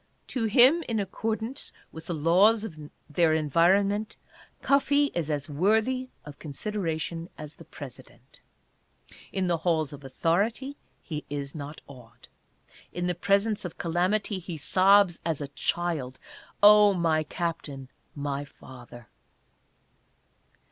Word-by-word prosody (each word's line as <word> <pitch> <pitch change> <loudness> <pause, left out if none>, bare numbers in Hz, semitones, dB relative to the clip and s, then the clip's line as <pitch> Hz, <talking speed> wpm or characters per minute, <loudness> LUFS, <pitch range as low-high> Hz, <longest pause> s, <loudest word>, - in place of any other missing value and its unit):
To 245 -4 -1
him, 255 +10 +6
in 225 -2 0
accord 220 +2 -2 0.5
with 160 +1 -10
the 175 - -2
laws 190 +8 +4
of 210 -8 -6 0.3
their 160 +1 +2
environment, 190 +7 +2 0.5
Cuffee 285 +1 +3
is 165 -3 -2
as 145 -2 -2
worthy 220 - +1 0.2
of 145 -1 -11
consideration 165 0 -4
as 150 0 -9
the - - -15
President. - - -13 0.9
In 190 -1 -1
the 175 -2 +1
halls 160 -3 0
of 145 0 -11
authority 200 - -1 0.3
he 150 -3 -5
is 140 -1 -4
not 150 0 -8
awed. 125 -4 -15 0.6
In 175 0 -3
the 180 - 0
presence 200 +4 +1
of 175 -3 -7
calamity 185 +4 0
he 175 -2 -7
sobs, 185 +3 +4
as 160 -3 -2
a 145 -2 -5
child, 145 -3 -2 0.3
" - - -28
Oh 210 -1 +8
my 165 -3 +1
Captain 155 -4 -5 0.2
— - - -41 0.2
my 140 +1 -3
Father 120 -4 -13
170 Hz, 130 wpm, -27 LUFS, 150-205 Hz, 0.9 s, Oh